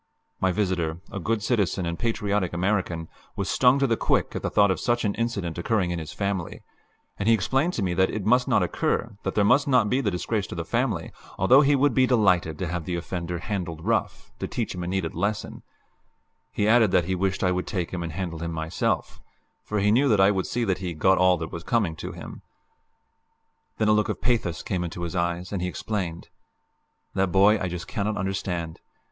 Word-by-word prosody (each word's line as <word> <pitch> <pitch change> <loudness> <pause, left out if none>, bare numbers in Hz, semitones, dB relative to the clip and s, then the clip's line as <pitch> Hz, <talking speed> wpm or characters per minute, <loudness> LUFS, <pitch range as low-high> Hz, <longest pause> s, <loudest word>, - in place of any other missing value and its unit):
My 95 - +2
visitor, 90 -4 -1
a 100 - -4
good 105 +3 -1
citizen 100 -6 0
and 85 0 -2
a - - -14
patriotic 105 -5 0
American, 90 -3 -1 0.3
was 100 - -2
stung 125 +1 +4
to 140 - +2
the 115 -3 +2
quick - - 0
at - - -2
the - - -1
thought 100 -2 +4
of 95 - -1
such 120 -1 0
an 100 - +1
incident 100 -8 -2
occurring 90 -1 0
in 85 - -2
his 80 -2 -7
family, 100 -4 -3 0.6
and 100 - -1
he 115 - +6
explained 135 - 0
to 105 - -2
me 90 -2 0
that 95 +1 +3
it 105 -3 -4
must 125 +3 +3
not - - +3
occur, 110 -1 -1
that - - -3
there 105 - +3
must 130 +7 +4
not 125 -6 +3
be 130 +2 +2
the 110 - 0
disgrace 100 +2 -2
to - - -7
the 85 -1 -4
family, 115 -6 -1 0.3
although 125 +9 +6
he 145 0 +4
would 140 -1 +3
be 130 +1 +4
delighted 90 - +2
to 95 - -3
have 85 -1 -3
the 90 - -2
offender 85 0 -4
"handled 85 -3 -4
rough" - - -1
to - - -3
teach - - -3
him 90 - -5
a - - -4
needed 95 -3 -2
lesson; 100 +5 -2 0.9
he 105 - 0
added 115 -1 +5
that 90 -2 +2
he 95 - -1
wished 95 +1 -1
I 90 - +3
would 90 0 -2
take 90 -4 -3
him 90 - -3
and 85 -1 -4
handle 85 -1 -4
him 85 0 -3
myself, 80 +1 -2 0.4
for 105 - -3
he 105 0 +3
knew 135 +5 +4
that 105 -4 +3
I 95 +1 +6
would 95 -2 -1
see 120 - -1
that 95 -5 0
he 90 -3 -4
"got 95 +5 +3
all 90 -1 +5
that 80 0 -6
was 85 - -6
coming 100 -7 0
to - - -6
him." - - -9 1.4
Then 110 - +1
a - - +5
look 105 0 +2
of - - -2
pathos 110 -9 0
came 90 -2 -2
into 85 0 -5
his 85 +1 -4
eyes, 85 +1 -2
and 95 - -2
he 90 - -1
explained: 90 -3 -4 0.8
"That 95 -1 +1
boy 100 +3 +5
I 95 - -1
just 90 -1 -5
cannot 105 +1 -2
understand. 90 -4 -3
95 Hz, 225 wpm, -25 LUFS, 85-110 Hz, 1.4 s, he